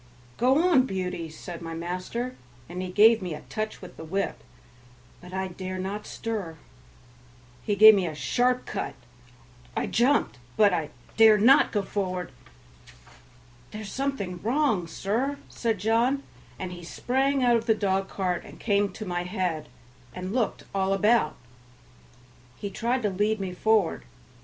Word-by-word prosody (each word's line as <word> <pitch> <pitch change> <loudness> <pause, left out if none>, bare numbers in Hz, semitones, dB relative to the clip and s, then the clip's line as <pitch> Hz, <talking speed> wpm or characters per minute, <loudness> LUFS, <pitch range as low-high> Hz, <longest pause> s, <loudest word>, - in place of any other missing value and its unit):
"Go 270 +8 +4
on, 260 -5 +5
Beauty," 180 -4 -3
said 170 +2 -9
my 165 -1 -6
master, 185 +9 -4 0.3
and 180 +2 -5
he 185 - -4
gave 220 +4 +6
me 175 -4 -4
a - - -9
touch 215 -2 -4
with 180 - -11
the - - -8
whip, 190 +5 -3 0.8
but 180 0 -12
I 190 0 -2
dare 185 +1 -6
not 195 +3 -4
stir; 205 -8 -4 1.0
he 205 - -1
gave 215 +2 +10
me 190 -4 +1
a 155 - -5
sharp 250 +10 +1
cut; 195 - -4 0.8
I - - +1
jumped, 240 - +2 0.2
but 205 -3 +5
I 160 -4 -1 0.3
dare 220 -1 +8
not 255 +7 +6
go 205 -2 0
forward. 185 -5 -3 1.4
"There's 215 -2 -7
something 205 -10 -3
wrong, 230 - +1
sir," 230 - -1
said 225 -3 -1
John, 230 +7 +1 0.3
and 185 -1 -5
he 175 -1 -9
sprang 265 +9 0
out 240 -1 +5
of 230 +1 -5
the 220 - +4
dog 195 -2 0
cart 180 -3 -2
and - - -13
came 200 -2 +1
to 215 - -7
my 175 -2 -2
head 180 -4 -3 0.5
and 185 +2 -5
looked 235 -4 -1
all 195 0 +1
about. 215 +4 +3 1.2
He 200 - -5
tried 245 +4 -1
to 210 - +1
lead 210 +3 0
me 190 -2 -4
forward. 210 -1 +1
200 Hz, 155 wpm, -26 LUFS, 180-230 Hz, 1.4 s, gave